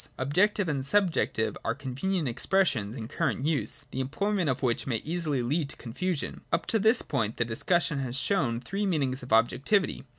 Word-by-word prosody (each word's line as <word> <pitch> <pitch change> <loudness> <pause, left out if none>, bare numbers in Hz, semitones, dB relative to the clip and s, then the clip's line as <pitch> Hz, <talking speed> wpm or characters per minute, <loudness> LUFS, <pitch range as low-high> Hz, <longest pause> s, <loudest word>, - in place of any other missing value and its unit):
Objective 185 +9 +2
and 140 -4 -1
subjective 165 - +1
are 115 - -1
convenient 150 +7 -2
expressions 125 - +1
in 115 -4 -6
current 130 - -1
use, 140 -3 0
the 130 - -4
employment 180 +6 0
of 130 +1 -1
which 120 0 0
may 125 - 0
easily 155 -5 -1
lead 145 +4 0
to - - -5
confusion. 165 +7 -3
Up 165 - +1
to 225 - +1
this 220 +3 +4
point, 110 0 -1
the 120 - +1
discussion 150 +6 +1
has 130 -2 -3
shown 130 -7 +1
three 200 +10 -2
meanings 135 -7 0
of 125 - -10
objectivity. 130 - +2
140 Hz, 175 wpm, -28 LUFS, 125-185 Hz, -, this